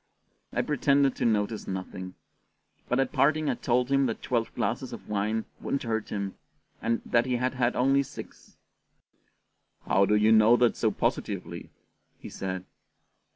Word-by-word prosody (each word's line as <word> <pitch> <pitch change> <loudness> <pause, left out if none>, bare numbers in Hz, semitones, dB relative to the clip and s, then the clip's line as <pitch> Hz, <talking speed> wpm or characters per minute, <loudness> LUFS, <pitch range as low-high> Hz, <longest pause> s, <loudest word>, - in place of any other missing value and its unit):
I - - 0
pretended 140 -1 +2
to - - -1
notice 110 -1 0
nothing; 95 -1 -6 0.7
but 125 - +1
at 135 - +1
parting 150 +2 +2
I - - 0
told 125 +1 0
him 135 -1 +3
that 115 - -4
twelve 120 -3 -1
glasses - - -2
of - - -9
wine 105 +2 -1
wouldn't 140 - -2
hurt 110 -2 -2
him, 100 -2 -4 0.4
and 115 0 -1
that 120 +1 +2
he 125 - +1
had 125 +1 0
had 125 -1 0
only 135 +2 +3
six. 140 - -10 1.3
"How 100 0 +3
do 105 - +3
you 105 +1 +4
know 110 +2 +6
that 120 -1 +3
so - - +1
positively?" - - -3 0.5
he - - -10
said. 95 -1 -5
120 Hz, 155 wpm, -28 LUFS, 105-130 Hz, 1.3 s, know